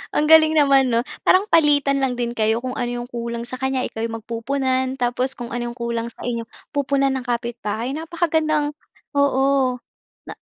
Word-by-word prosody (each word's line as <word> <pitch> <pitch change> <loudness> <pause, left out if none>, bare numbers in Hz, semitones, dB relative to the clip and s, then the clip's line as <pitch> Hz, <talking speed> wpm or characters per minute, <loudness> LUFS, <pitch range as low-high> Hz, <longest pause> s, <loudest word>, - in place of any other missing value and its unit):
Ang 300 - +3
galing 315 0 +6
naman, 275 -3 +5
'no? 235 +1 +1 0.2
Parang 375 +2 +4
palitan 290 -3 +4
lang 255 -2 0
din 235 -1 -2
kayo. 220 -1 +1
Kung 255 0 -4
ano 240 - -2
'yong 240 0 -5
kulang 235 0 -4
sa 255 +1 -7
kanya 265 -1 0
ikaw 225 - -6
'yung 225 0 -3
magpupunan, 260 +3 -1
tapos 250 +1 -1
kung 240 -1 -7
ano 240 0 -2
'yong 240 - -10
kulang 235 -1 -2
sa - - -13
inyo 235 -1 -2 0.3
pupunan 275 -1 +1
ng 260 -2 -4
kapitbahay. 235 0 -3
Napakagandang 315 -2 0 0.4
oo. 275 -2 +2 0.5
Na - - -7
255 Hz, 180 wpm, -21 LUFS, 235-280 Hz, 0.5 s, galing